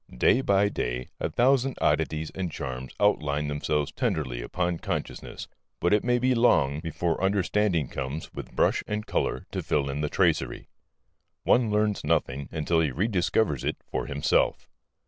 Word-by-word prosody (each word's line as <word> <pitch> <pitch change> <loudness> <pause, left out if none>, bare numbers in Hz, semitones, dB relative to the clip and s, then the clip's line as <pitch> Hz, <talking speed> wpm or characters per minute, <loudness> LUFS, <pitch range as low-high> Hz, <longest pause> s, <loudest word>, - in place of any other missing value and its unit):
Day 125 - +4
by 100 -4 +3
day 60 -10 -3
a - - -1
thousand 130 +1 +2
oddities 80 0 0
and 95 -3 -4
charms 65 -3 -5
outline 75 -8 +1
themselves 75 0 -1
tenderly 65 -6 -2
upon 85 +6 -2
consciousness, - - -5 0.3
but 85 - +2
it 105 - +3
may 120 0 +2
be 130 +1 +2
long 75 - +3
before 80 +2 -2
understanding 95 -4 +1
comes 70 +3 -5
with - - -7
brush - - +2
and 105 0 -3
colour - - -1
to - - -2
fill 70 -2 0
in 70 +2 -3
the 75 - -1
tracery. - - +1 0.8
One 120 -2 +3
learns 105 -1 +1
nothing 70 -3 0
until 80 +1 +1
he 80 -2 +2
rediscovers 90 - 0
it - - -1
for - - -2
himself. 70 +1 +1
80 Hz, 155 wpm, -27 LUFS, 70-105 Hz, 0.8 s, Day